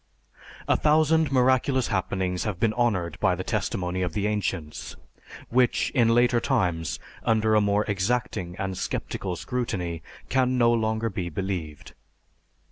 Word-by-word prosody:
_A - - +2
thousand 155 0 +3
miraculous 130 0 +2
happenings 95 -2 -1
have 100 -5 -3
been 110 -2 +2
honoured 95 -9 0
by 95 -3 +2
the 95 - -4
testimony 95 -4 -2
of 90 -3 -2
the 100 - -1
ancients, 95 -7 -3 0.5
which 125 0 +2
in 115 -3 +3
later 120 0 +4
times 85 -7 0 0.2
under 110 -1 +2
a 105 - +5
more 100 0 +2
exacting 95 -3 -1
and 95 -1 -3
sceptical 90 0 -3
scrutiny 90 -8 -3 0.3
can 130 -1 +1
no 120 -1 +4
longer 110 0 0
be 90 -2 -3
believed. 85 -4 -5
105 Hz, 135 wpm, -26 LUFS, 90-120 Hz, 0.5 s, a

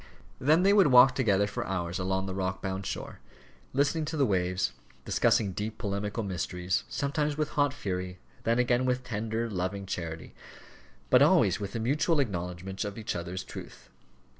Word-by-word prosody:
Then 155 +7 +4
they 200 +1 +5
would 200 -5 +6
walk 130 0 +7
together 105 -7 +2
for 100 - -4
hours 90 -1 -2
along 95 +1 -1
the 95 - -4
rock 95 -1 -2
bound 95 0 -4
shore, - - -5 0.5
listening 140 +4 +1
to 155 +1 -4
the 140 - +4
waves, 90 -3 0 0.3
discussing 100 -3 +2
deep 105 +4 -4
polemical 105 +1 -3
mysteries, 90 -1 -2
sometimes 145 +1 -1
with 155 -1 0
hot 145 -1 +2
fury, 90 -8 -4 0.3
then 115 +1 +2
again 125 0 +2
with 125 0 0
tender, 115 0 -2
loving 100 -1 -3
charity, 85 -3 -5 0.8
but - - +7
always - - +4
with 100 +2 -5
a - - -1
mutual 145 +7 +1
acknowledgment 95 -4 -3
of 105 0 -5
each 110 - -3
other's 90 +2 -4
truth. - - -11
105 Hz, 165 wpm, -29 LUFS, 95-130 Hz, 0.8 s, walk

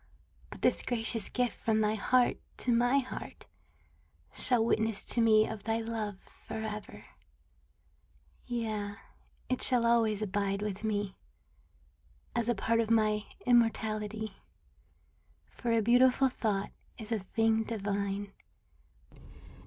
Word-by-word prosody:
But - - -11
this - - +3
gracious 225 -2 0
gift 250 -1 -1
from 220 -1 +2
thy 215 0 +2
heart 245 +3 +2 0.2
to 245 - +1
my 245 +3 +3
heart 260 -2 -5 0.9
Shall 240 -3 +2
witness 220 -2 +1
to 235 - +3
me 220 -1 +5
of 220 -2 -6
thy 225 0 +1
love 225 -3 -4 0.3
forever; 215 -1 -6 1.4
Yea, 215 -4 -3 0.5
it 255 - -1
shall 245 -2 +3
always 225 -3 +2
abide 200 0 -1
with 210 0 -4
me 205 -3 -2 1.2
As 235 0 0
a 240 - +2
part 230 +3 +1
of 225 -1 0
my 215 -2 +2 0.2
immortality; 220 -3 +1 1.2
For 240 - -5
a 230 -1 +3
beautiful 250 +3 +4
thought 210 -5 -2 0.3
is 220 -1 -8
a 225 - +1
thing 225 +3 +1
divine. 200 -2 -3
220 Hz, 120 wpm, -31 LUFS, 210-235 Hz, 1.4 s, me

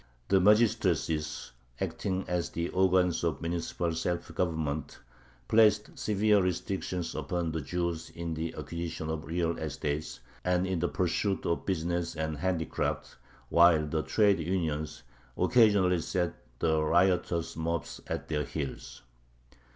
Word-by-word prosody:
The 95 0 +5
magistracies, 90 -7 +2 0.3
acting 95 -1 -2
as 85 -1 -1
the 85 +1 -3
organs 90 -2 +2
of 80 -5 0
municipal 85 0 -2
self 85 0 -2
government, 80 -4 -2 0.5
placed 105 -1 +4
severe 105 0 +3
restrictions 90 -1 -2
upon 80 +2 -2
the 80 0 -2
Jews 85 +2 -2
in 85 -1 -5
the 80 +1 -4
acquisition 85 -2 -4
of 80 -3 -4
real 85 +1 -1
estate 75 0 -3 0.2
and 90 0 +2
in 95 -2 -1
the 90 - +1
pursuit 95 +2 0
of 85 - -1
business 85 -2 -1
and 80 -1 -2
handicrafts, 85 -1 -2 0.3
while 85 -2 +6
the 80 +1 -1
trade 100 +3 +3
unions 80 -3 -2 0.3
occasionally 100 -7 +4
set 90 0 -1 0.2
the 80 +1 +2
riotous 85 +1 +2
mobs 85 +1 -3
at - - -4
their 75 -1 -1
heels. 70 -5 -6
85 Hz, 130 wpm, -30 LUFS, 80-90 Hz, 0.5 s, while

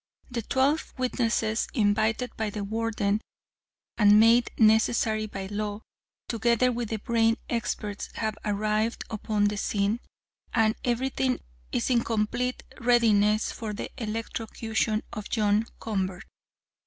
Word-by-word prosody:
The 240 -1 -2
twelve 270 +7 0
witnesses 230 -3 0
invited 220 +2 +1
by 220 -1 -1
the 205 0 -4
Warden, 215 -1 -1 0.8
and 210 0 +7
made 230 +2 +5
necessary 220 0 +3
by 195 -2 -6
law, 205 +1 -3 0.5
together 235 +2 +2
with 235 -2 -3
the 220 - -1
brain 225 +1 +2
experts, 210 -2 -3
have 220 -1 -2
arrived 215 +2 0
upon 215 -1 -1
the 205 0 0
scene, 205 +2 0 0.6
and 220 -2 +4
everything 240 - 0 0.3
is 120 - 0
in 235 -2 +3
complete 235 +3 -1 0.2
readiness 220 -3 +3
for 220 -2 -5
the - - -5
electrocution 220 0 -2
of 215 -3 -6
John 215 0 +2
Convert." 190 -2 -3
220 Hz, 120 wpm, -27 LUFS, 210-235 Hz, 0.8 s, and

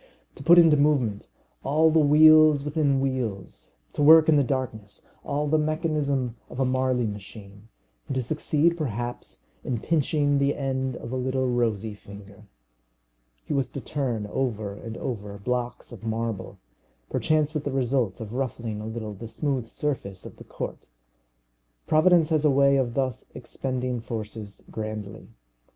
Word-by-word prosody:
To - - -12
put 170 +4 +6
into 165 -3 +7
movement 130 - +1 0.4
all 155 +3 +3
the 160 - +4
wheels 155 -1 +6
within 145 -2 +1
wheels, 120 -8 -4 0.2
to - - -3
work 160 +2 +8
in 160 - +5
the 145 - +4
darkness 120 -6 -4 0.2
all 145 +1 -1
the 155 +1 +2
mechanism 150 -6 -1
of 125 - -8
a 135 - +2
Marly 130 -1 +1
machine, 105 0 -9 0.4
and 135 - -3
to 130 - 0
succeed 155 +4 +1
perhaps 120 -6 -5 0.2
in 120 -3 -2
pinching 145 -2 +1
the 140 +1 +1
end 130 -2 -2
of 115 - -8
a - - -2
little 130 0 -1
rosy 115 -3 0
finger! 100 0 -13 1.0
He - - -3
was 135 -3 0
to - - -4
turn 125 -6 -3
over 110 -3 -2
and 115 +2 -8
over 105 -5 -5
blocks 125 +4 -3
of 115 -4 -11
marble, 110 -3 -3 0.5
perchance 155 -1 +1
with 150 -2 -2
the 145 - -3
result 125 -6 0
of 110 0 -7
ruffling 115 -4 -3
a 110 - -6
little 110 -1 -5
the 115 +3 -8
smooth 130 -1 -2
surface 115 -10 -4
of - - -11
the - - -11
court! - - -7 1.0
Providence 165 0 +4
has 155 -2 +1
a 150 - +5
way 140 0 +4
of 120 -3 -1
thus 130 -4 -2
expending 125 0 -3
forces 110 -2 -7
grandly. 110 -1 -6
130 Hz, 155 wpm, -25 LUFS, 110-145 Hz, 1.0 s, work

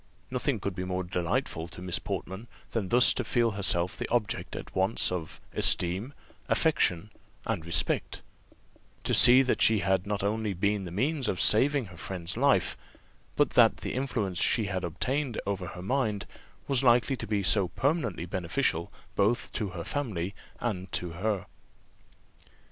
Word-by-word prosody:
Nothing 125 -1 -1
could 100 0 -3
be 90 - -4
more 90 0 -2
delightful 85 -2 -2
to 85 - -10
Miss 90 -1 -2
Portman 95 +2 -5 0.2
than 105 -5 -2
thus 125 +1 +6
to 125 - -2
feel 115 +1 +1
herself 95 -3 0
the - - -5
object 115 -5 -1
at - - -8
once 95 +2 +1
of 85 -3 -5
esteem, 95 +10 +1 0.3
affection, 105 - +1 0.3
and 80 - -2
respect; 80 -2 0 0.8
to - - 0
see 125 +2 +9
that 130 - 0
she 110 - +6
had 95 -1 0
not 105 -1 -2
only 105 0 -1
been 100 +2 0
the - - -6
means 135 - 0
of 90 - -1
saving 135 +4 +4
her 90 -2 -13
friend's 90 +1 -5
life, 140 +4 +2 0.6
but - - +2
that - - +5
the - - -5
influence 115 -9 -2
she 115 -3 +2
had 95 -2 -3
obtained 125 - -2
over 95 -2 -3
her 90 - -8
mind 110 -3 -1 0.4
was 135 -3 +1
likely 125 +1 +4
to - - -6
be 100 -1 0
so 95 0 +3
permanently 125 - -1
beneficial 90 0 -1 0.2
both 105 +4 +1
to 105 -3 -2
her 90 -2 -6 0.8
and 95 -6 -3
to - - 0
her 100 +3 -2
family. - - -23
100 Hz, 160 wpm, -28 LUFS, 90-120 Hz, 0.8 s, see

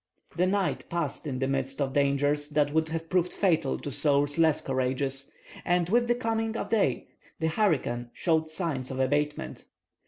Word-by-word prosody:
The 180 +2 +2
night 195 0 0
passed 165 -3 -3
in 130 -3 -3
the 135 +1 0
midst 135 0 -2
of 135 -2 -1
dangers 145 +1 +1
that 145 -1 +1
would 160 0 +1
have 165 0 -4
proved 180 0 +1
fatal 165 -8 +2
to 145 - -6
souls 145 +1 +1
less 160 -2 +4
courageous; 135 +1 -1 0.3
and 175 -1 +1
with 240 +3 +3
the 240 - +3
coming 225 -2 -1
of - - -4
day 195 - +1 0.3
the 160 - +1
hurricane 140 - 0
showed 160 -2 0
signs 155 -6 -2
of 130 - -5
abatement. 145 +3 -1
150 Hz, 175 wpm, -28 LUFS, 135-175 Hz, 0.3 s, less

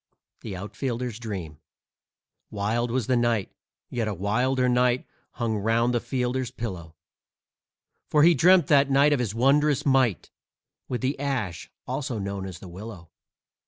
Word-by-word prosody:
THE 105 -4 -7
OUTFIELDER'S 120 +4 -4
DREAM 95 -10 -6 0.9
Wild 110 +4 -1
was 125 -1 -1
the 130 - +1
night, 120 -4 +1 0.4
yet 115 -3 -1
a 105 - -2
wilder 125 +7 +1
night 125 0 +2 0.3
Hung 115 -2 -1
'round 115 +3 +1
the 120 - +2
fielder's 125 0 -2
pillow, 95 -10 -7 1.1
For 150 -1 +4
he 170 +2 +7
dreamt 175 +5 +5
that 140 -3 +4
night 140 +2 +4
of 145 - +1
his 115 -4 -2
wondrous 140 +3 +3
might 130 - +2 0.6
With 125 - -3
the 135 +2 -1
ash, 125 -11 -3 0.2
also 130 -1 -3
known 100 -1 -4
as 90 -2 -8
the 95 - -11
willow. 90 -2 -10
120 Hz, 145 wpm, -26 LUFS, 105-130 Hz, 1.1 s, he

